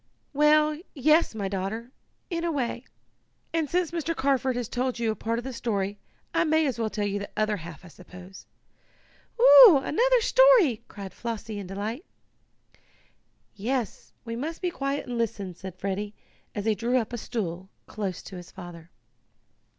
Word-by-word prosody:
"Well, 300 +1 +4 0.2
yes, 305 +3 +3
daughter, 200 +3 -4 0.4
in 335 -1 -2
a 340 - 0
way. 255 -3 -2 0.7
And, 320 -3 0
since 355 -2 0
Mr. 330 -1 -2
Carford 265 -2 +1
has 245 -2 -2
told 255 +2 -2
you 230 -2 0
part 230 +1 -2
of 240 - -4
the 265 0 -6
story, 205 -4 -2 0.3
I - - +3
may 315 -1 +2
as 260 -5 -2
well 225 -1 0
tell 210 -1 -2
you 205 0 -1
the 200 - -6
other 215 -1 +1
half, 170 +1 -10
I - - -12
suppose." 180 +2 -13 0.9
"Oh, - - +10
another - - +3
story!" 450 - +5
cried 195 -2 -9
Flossie, 225 -2 -5
in 195 - -7
delight. 210 - -4 1.5
"Yes, 235 +2 -3
we 230 0 -4
must 310 +7 -4
be 360 -2 -1
quiet 275 -2 -3
and 245 -2 -4
listen," 200 -5 -2
said 185 +1 -9
Freddie, 200 +2 -3 0.4
as 205 -1 -3
he 220 - +3
drew 235 +4 0
up 240 -1 -2
a - - -2
stool 190 -5 -4 0.2
close 200 -4 -5
to 190 - -9
his 175 0 -10
father. 175 -3 -11
230 Hz, 165 wpm, -26 LUFS, 200-295 Hz, 1.5 s, Oh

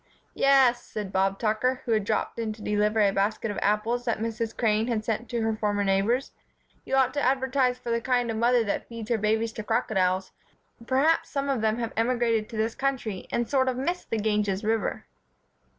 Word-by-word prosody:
"Yes," 265 -3 +4
said 210 -3 -6
Bob 195 +1 +1
Tucker, 235 +4 0
who 235 - -2
had 215 -3 +2
dropped 215 +2 -1
in 220 -2 -2
to 210 0 -12
deliver 210 +1 +2
the 195 - +2
basket 210 +3 0
of 205 - -4
apples 220 +4 +1
that 235 - 0
Mrs. 225 0 -3
Crane 220 -1 +1
had 220 -3 -1
sent 225 +1 -2
to 235 -2 -1
her 225 0 0
former 205 -1 0
neighbors, 200 +7 +1 0.5
"you 270 - -1
ought 260 -1 +3
to 285 - -1
advertise 260 -1 +1
for 245 -1 -5
the 230 0 0
kind 245 -2 +1
of 220 - -3
mother 240 +1 +3
that 205 - -3
feeds 230 0 -7
her 230 - +2
babies 220 +2 0
to 215 - -6
crocodiles. 190 -4 0 0.6
Perhaps 285 +5 +2
some 280 0 -2
of 265 -5 0
them 220 0 +1
have 230 -2 -3
emigrated 230 -2 +1
to 225 - -7
this 220 +1 0
country 265 -8 -3
and 235 -1 0
sort 260 -1 +2
of 250 - -2
miss 345 +7 -2
the 225 - -3
Ganges 210 -2 0
River." 220 -1 -1
225 Hz, 205 wpm, -26 LUFS, 210-250 Hz, 0.6 s, Yes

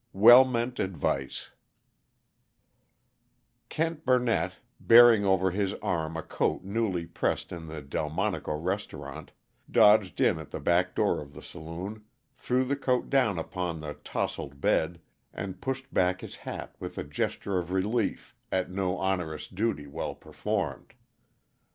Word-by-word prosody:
WELL 120 +6 +9
MEANT 120 0 -2
ADVICE 75 -7 -2 2.2
Kent 165 0 -2
Burnett, 125 -2 +2 0.3
bearing 115 -3 +7
over 95 -1 +3
his 100 +1 -1
arm 80 -2 -2
a 80 - -4
coat 90 - -1
newly 100 -4 -1
pressed 85 - -2
in 80 -1 -7
the 80 -2 -7
Delmonico 75 +2 -2
restaurant, 95 +6 -5 0.4
dodged 105 -3 +5
in 80 - +3
at 80 - -9
the - - -5
back 90 +1 +1
door - - +1
of 70 -1 -11
the - - -10
saloon, 90 +7 -7 0.3
threw 130 0 0
the 140 +2 0
coat 130 -3 0
down 125 -9 +3
upon 85 0 -3
the 75 -1 -5
tousled 70 0 -4
bed, 85 +4 +1 0.4
and 95 -1 -6
pushed 135 0 -4
back 90 0 +2
his - - -8
hat - - -7
with - - -7
a - - -2
gesture 95 -2 -2
of 85 -1 -5
relief 105 +4 -1 0.2
at 95 -1 0
an 95 +1 -5
onerous 95 -4 -1
duty 100 -6 -2
well 70 - -5
performed. - - -4
95 Hz, 140 wpm, -28 LUFS, 85-115 Hz, 2.2 s, WELL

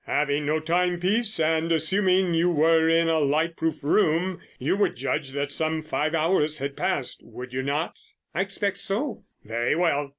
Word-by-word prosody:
Having 145 0 0
no 155 +1 +1
timepiece, 180 +6 +1
and 160 +1 +1
assuming 185 +3 +2
that 165 - +1
you 175 +1 +3
were 160 0 +3
in 165 0 +3
a 165 -1 +2
light 155 +3 +1
proof 160 -3 -2
room, 170 +3 +1 0.2
you - - 0
would 205 - +1
judge 140 +2 -2
that 140 0 -2
some 160 +1 -1
five 155 +1 -1
hours 155 -2 +1
had 140 +1 -4
passed, - - -2
would 125 0 -10
you 130 - -1
not?" 145 +5 -2 0.3
"I 170 - 0
expect 200 0 -1
so." 235 +8 -2 0.2
"Very 115 +5 0
well. 150 -4 +1
160 Hz, 175 wpm, -25 LUFS, 150-180 Hz, 0.3 s, you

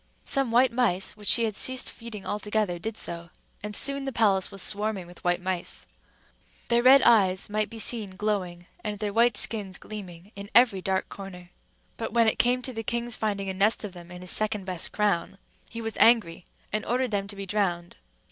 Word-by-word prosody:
Some 275 -3 +1
white 245 +2 +4
mice, 210 -7 0
which 210 -1 -12
she 235 - +6
had 220 -3 -1
ceased 260 +3 +3
feeding 230 -4 -9
altogether, 210 -3 -2
did 220 +4 -5
so; 170 0 -3 0.3
and 210 0 -5
soon 275 +3 +1
the 270 - -2
palace 200 -6 +2
was 195 - -9
swarming 210 -2 -2
with 175 +1 -15
white 175 0 +1
mice. 185 -2 -3 0.8
Their 235 0 +3
red 260 +2 +7
eyes 195 -3 +3
might 215 -1 0
be 230 - -9
seen 215 -3 0
glowing, 185 -4 -3 0.2
and 210 -2 -4
their 205 0 -3
white 230 -1 +3
skins 200 -4 0
gleaming, 190 -3 -10
in 200 0 -8
every 230 -6 +5
dark 190 0 -1
corner; 180 -3 -10 0.5
but 225 - -4
when 230 -1 +4
it 220 - +1
came 250 +1 +2
to 255 - -3
the 225 - -4
king's 235 +1 -2
finding 200 -2 -2
a 190 - -2
nest 205 +5 +2
of 205 -3 -6
them 175 -1 -12
in 180 0 -10
his 180 - -2
second 215 -2 0
best 180 -3 0
crown, 200 -3 -1 0.3
he 230 - -6
was 225 -1 -4
angry 215 -8 +3 0.3
and 215 - 0
ordered 250 0 0
them 200 -1 -1
to 200 - -7
be 195 0 -5
drowned. 180 -4 -2
210 Hz, 205 wpm, -26 LUFS, 190-230 Hz, 0.8 s, red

